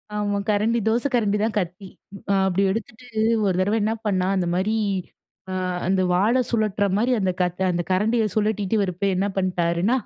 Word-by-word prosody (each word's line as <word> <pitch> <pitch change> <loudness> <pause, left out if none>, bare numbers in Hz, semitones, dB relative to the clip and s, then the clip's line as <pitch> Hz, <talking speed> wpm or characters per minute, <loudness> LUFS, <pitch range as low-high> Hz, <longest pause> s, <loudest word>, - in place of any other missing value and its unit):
ஆமா. 205 -1 -1
கரண்டி, 215 +3 +2
தோசை 235 +5 +2
கரண்டி 210 -3 +1
தான் 220 -1 -1
கத்தி. 180 +2 -5 0.4
அ - - +4
அப்டி 190 +1 +1
எடுத்துட்டு, 225 +4 -6 0.4
ஒரு 190 - +1
தரவ 205 +4 +1
என்னா 215 +2 +1
பண்ணான்? 190 -1 +1
அந்த 180 - 0
மாரி, 190 +4 0 0.8
அ - - -3 0.3
அந்த 190 0 +2
வாள 215 +8 +3
சுழட்டுற 215 -3 +1
மாரி 240 +4 +2
அந்த 185 -1 +1
கத் 180 +1 -1
அந்த 175 0 -1
கரண்டிய 220 +4 +2
சுழட்டிட்டு 210 -1 +1
வரப்ப 185 +1 -2
என்ன 200 +2 0
பண்ணிட்டாருன்னா? 180 +4 +1
200 Hz, 165 wpm, -23 LUFS, 185-220 Hz, 0.8 s, அ